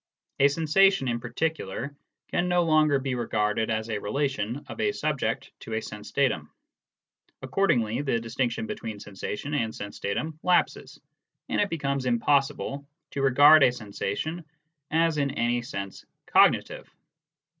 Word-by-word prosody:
A 140 - +7
sensation 165 +2 +3
in 120 -1 -1
particular 135 0 -3 0.3
can 175 - 0
no 175 0 +3
longer 155 -3 +4
be 135 -1 -2
regarded 110 -2 0
as 110 0 -1
a 110 -2 -2
relation 135 +2 -2
of - - -9
a 415 - +2
subject - - -2
to - - -6
a - - -1
sense - - -8
datum; - - 0 0.9
accord 195 0 0
ingly 115 +2 +1
the 130 -5 0
distinction 120 - -2
between 115 - -6
sensation 105 +8 -6
and 115 -6 -1
sense 100 0 -7
datum 155 +10 -3
lapses, 180 -1 +1 0.5
and - - +1
it 205 - +1
becomes 140 -5 -2
impossible 135 +3 +1 0.3
to 140 - -3
regard 145 +3 +7
a 130 -2 +6
sensation 120 - -4 0.5
as 165 -1 +2
in 140 -1 +1
any 120 +1 +1
sense 100 -4 -6 0.2
cognitive. - - +3
135 Hz, 145 wpm, -27 LUFS, 115-155 Hz, 0.9 s, A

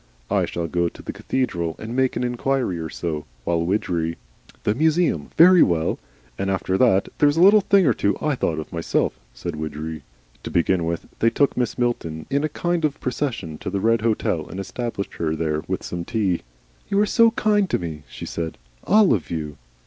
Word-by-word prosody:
I - - +3
shall 85 -1 -3
go 85 +1 0
to - - -14
the - - -5
cathedral 85 -11 -2
and 115 +2 -6
make 130 0 +2
an - - -1
inquiry 125 -5 -1
or 80 0 -4
so, 75 -2 -4 0.2
while 85 -1 0
Widgery 85 -3 -1 0.2
" - - -25
"The 105 - +2
museum. 155 - +1
Very 180 +1 +8
well. 80 -2 +2 0.4
And 95 - -1
after 95 -1 0
that 100 -3 +3
there's 145 +1 +4
a - - +4
little 205 +2 +7
thing 195 -1 +4
or 130 - +4
two 100 -2 0
I've 150 -4 -1
thought 80 - 0
of 80 - -6
myself," 85 -1 -1 0.2
said - - -5
Widgery. 80 +1 -5 0.4
To - - -6
begin 85 0 +1
with 85 0 -3
they 115 - +4
took 140 +4 +2
Mrs. 125 -3 -1
Milton 80 -11 -2
in 140 +2 +1
a 155 - 0
kind 175 +2 -1
of 150 -2 0
procession 120 - -3
to - - -4
the 100 +1 -1
Red 115 +2 +2
Hotel 110 -1 0
and 95 - -6
established 105 +1 -4
her 80 -1 -1
there 75 -1 -1
with - - -2
some 85 -1 -4
tea. 100 -4 0 0.5
"You 200 -1 +2
are 210 - +4
so 230 +2 +5
kind 210 -3 +1
to - - +2
me," 80 -4 -6
she - - -8
said. 80 -1 -4 0.3
"All 210 - +5
of 95 -8 -2
you." 75 -3 -4
100 Hz, 205 wpm, -23 LUFS, 85-140 Hz, 0.5 s, Very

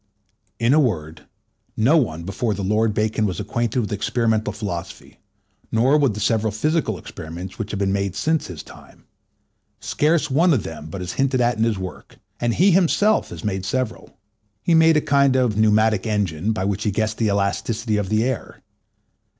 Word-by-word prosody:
In 115 +3 +2
a 155 - +5
word, 80 - -2 0.5
no 125 +9 +4
one 85 - 0
before 105 +4 -2
the 100 - -4
Lord 105 +3 +1
Bacon 110 0 0
was 95 - -4
acquainted 115 +3 -1
with 105 - -4
experimental 110 +1 0
philosophy, 100 -5 -7 0.5
nor 125 +6 +3
with 140 -8 +2
the - - -5
several 110 0 +1
physical 130 - 0
experiments 85 +6 -9
which 110 -2 -4
have 100 - -4
been 95 -1 +1
made 100 -2 -1
since 160 +5 0
his 90 -4 -8
time. - - -16 0.8
Scarce 150 -1 +1
one 165 +5 +4
of 110 - -1
them 80 -1 -8
but 90 +4 -6
is 90 - -5
hinted 135 -1 +1
at 120 -2 +1
in 115 - +3
his 115 -3 0
work, 95 -1 -8 0.2
and 120 -1 0
he 190 +3 +4
himself 195 +4 +3
had - - -8
made 95 -3 -2
several. 125 +3 -4 0.5
He 170 - +2
made 160 -1 +5
a - - +2
kind 140 -2 +3
of 125 -5 +2
pneumatic 110 -1 +3
engine, 100 -3 -1
by 105 -3 -2
which 100 +1 -1
he 105 - +1
guessed 110 +2 -1
the 115 - +2
elasticity 105 +2 -1
of 100 -2 -2
the 110 +1 +2
air. 130 -1 -4
110 Hz, 185 wpm, -22 LUFS, 100-130 Hz, 0.8 s, a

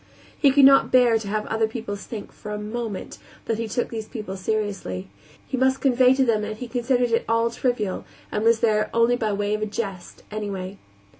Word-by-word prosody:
He 285 - +4
could 275 0 +6
not 275 0 +6
bear 245 -3 +5
to 215 - -7
have 210 +1 -1
the - - -5
other 220 0 +2
pupils 220 -3 -6
think, 220 -3 -7
for 210 - -9
a 210 - -3
moment, 215 0 -5 0.3
that 225 -1 -1
he 230 - -2
took 240 +3 -2
these 220 -2 -5
people 210 -6 -6
seriously; 195 - -3 0.4
he - - -3
must 265 +1 +2
convey 255 -1 +4
to 265 0 +3
them 225 -3 +2
that 215 0 -4
he 250 - -6
considered 245 0 0
it 230 - +2
all 230 0 +2
trivial, 235 -5 -1 0.3
and 210 - -1
was 230 0 +4
there 215 -2 +2
only 230 +1 +4
by 220 -3 -1
way 205 +1 -1
of 215 - -1
a 215 - -1
jest, 195 -4 -6
anyway. 200 -2 -5
220 Hz, 215 wpm, -24 LUFS, 210-245 Hz, 0.4 s, could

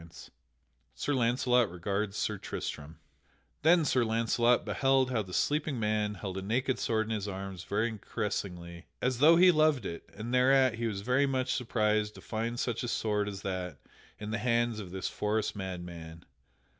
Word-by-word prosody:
[Sidenote: 85 0 -13 0.7
Sir 145 - -1
Launcelot 125 -1 +2
regards 100 +4 -3
Sir - - -1
Tristam] 75 +2 -6 0.6
Then 165 +1 +5
Sir 130 -3 +2
Launcelot 115 +2 +2
beheld 135 -1 +2
how 120 -3 +1
the 95 -3 -9
sleeping 145 - 0
man 105 -1 0
held 95 0 -5
a - - -5
naked 125 +6 0
sword 110 -1 0
in 110 - -6
his 105 -2 -3
arms 95 -2 -6
very 110 +1 -1
caressingly, 85 -4 -4
as 125 -1 0
though 160 +4 +7
he 180 +2 +7
loved 155 - +3
it, 85 -2 -6
and 110 +4 -5
thereat 130 -2 +4
he 115 - 0
was 100 -3 -3
very 125 +6 +2
much 130 -2 0
surprised 105 -3 0
to - - -11
find 115 +2 -3
such 120 -3 -1
a 120 - -3
sword 105 -3 0
as 100 -1 -8
that 90 -5 -4 0.4
in 105 0 -6
the 115 - -1
hands 120 -2 +1
of 95 -4 -7
this 95 +1 -4
forest 105 +1 -1
madman. 85 -4 -7
110 Hz, 175 wpm, -30 LUFS, 95-125 Hz, 0.7 s, though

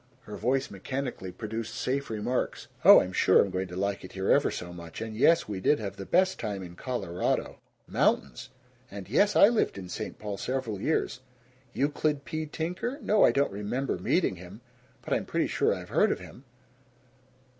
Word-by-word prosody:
Her 105 - -9
voice 135 +2 0
mechanically 125 -1 -5
produced 110 +2 -5
safe 140 +2 -2
remarks: 110 +3 -2 0.2
"Oh, - - +10
I'm 90 - -4
sure 95 - +5
I'm 100 - +2
going 95 +1 -2
to 90 - -9
like 100 +1 -2
it 90 - -10
here 95 0 0
ever - - +4
so 90 0 -6
much," 85 -1 -9
and 110 -1 -5
"Yes, 165 +9 +4
we 100 -3 -4
did 145 +10 +3
have 100 -3 -5
the 95 - -7
best 185 +1 +2
time 100 -4 -4
in 85 -1 -10
Colorado 95 -6 -2 0.3
mountains," 65 -3 0 0.4
and 100 -2 -8
"Yes, 200 - +3
I - - +8
lived 225 - +1
in 90 -2 -8
St. - - -5
Paul 105 -2 -5
several 120 -6 -3
years. 155 -2 0 0.5
Euclid 145 0 0
P. 155 0 -4
Tinker? 180 - -3
No, 210 0 +4
I - - +6
don't 140 -4 +1
REMEMBER 105 +7 -2
meeting 170 - +1
him, 90 +6 -11 0.4
but - - -2
I'm - - +1
pretty - - 0
sure - - +1
I've - - -4
heard - - +3
of - - 0
him." 130 - -13
110 Hz, 190 wpm, -28 LUFS, 95-140 Hz, 0.5 s, Oh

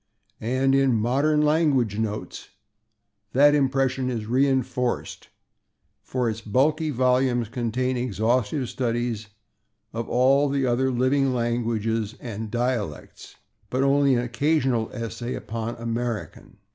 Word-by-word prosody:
And 130 +4 +1
in 135 -4 +3
/Modern 140 +7 +2
Language 145 -9 +2
Notes/ 110 -1 -4 0.8
that 145 +3 +6
impression 135 -2 +1
is 115 -4 -3
reinforced, 130 0 -1 0.7
for 125 -2 -2
its 110 0 -3
bulky 150 +9 +1
volumes 125 -3 +1
contain 125 +2 -1
exhaustive 120 +2 0
studies 120 -3 -2 0.7
of 115 +1 -4
all 135 +3 +3
the 135 -1 0
other 130 +2 +1
living 130 +1 +1
languages 115 -2 -1
and 110 -2 -6
dialects, 120 - -3 0.3
but 130 +1 0
only 140 -1 +3
an 120 - +1
occasional 130 -2 0
essay 120 +1 -5
upon 115 +1 -5
American. 115 -1 -5
125 Hz, 110 wpm, -24 LUFS, 115-135 Hz, 0.8 s, that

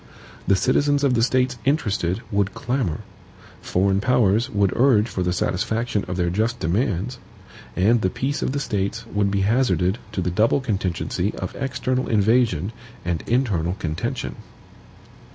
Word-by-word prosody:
The 100 - +5
citizens 145 +8 +2
of 135 -3 +3
the 115 - +2
States 125 +1 +1
interested 105 - 0
would 100 -1 0
clamour; 120 - -2 0.6
foreign 95 +1 +1
powers 115 0 +2
would 100 -4 +1
urge 120 -4 +4
for 95 - -4
the 90 0 +1
satisfaction 105 +4 -1
of 90 0 -3
their 85 -1 +1
just 115 +5 0
demands, 100 +5 -1 0.6
and 110 +5 +3
the 95 - +2
peace 140 +8 -2
of - - 0
the 140 - -1
States 105 -1 -2
would 105 -3 0
be 100 0 0
hazarded 105 -3 +2
to 95 - -1
the 90 0 -1
double 110 +9 +3
contingency 100 -9 -2
of - - -5
external 130 -1 -1
invasion 110 -4 +2 0.3
and 85 -2 -1
internal 100 -9 +1
contention. 80 -6 -4
105 Hz, 150 wpm, -23 LUFS, 95-125 Hz, 0.6 s, The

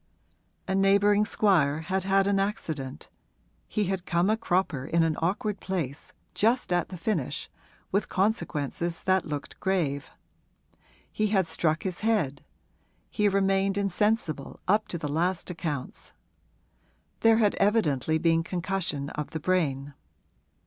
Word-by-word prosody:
A 190 - 0
neighbouring 200 +2 +4
squire 160 -9 +2
had 185 +3 -2
had 195 0 +3
an 200 0 +2
accident; 160 -9 -3 0.6
he 215 - 0
had 190 -1 -2
come 175 +4 +2
a - - +3
cropper 180 - 0
in 165 +4 +2
an 160 -1 +1
awkward 205 +4 -1
place 160 -7 -3 0.2
just 230 -3 +1
at 175 -2 0
the 185 - -7
finish 165 - -2 0.4
with 200 +1 0
consequences 170 - -1
that 190 -1 +2
looked 145 -2 -6
grave. 165 -8 -1 1.0
He 215 - 0
had 195 -3 +2
struck 160 0 0
his 185 -2 -3
head; 205 -11 0 0.7
he 210 -1 +2
remained 195 0 +2
insensible, 200 -6 0
up 210 +3 +3
to 175 - -4
the 155 - -4
last 175 +5 -1
accounts: 155 -6 -5 1.1
there 225 -1 +5
had 210 -3 +3
evidently 160 - +2
been 165 0 +3
concussion 175 -5 -2
of 150 -1 -4
the 160 - -4
brain. 145 -5 0
185 Hz, 135 wpm, -27 LUFS, 160-200 Hz, 1.1 s, there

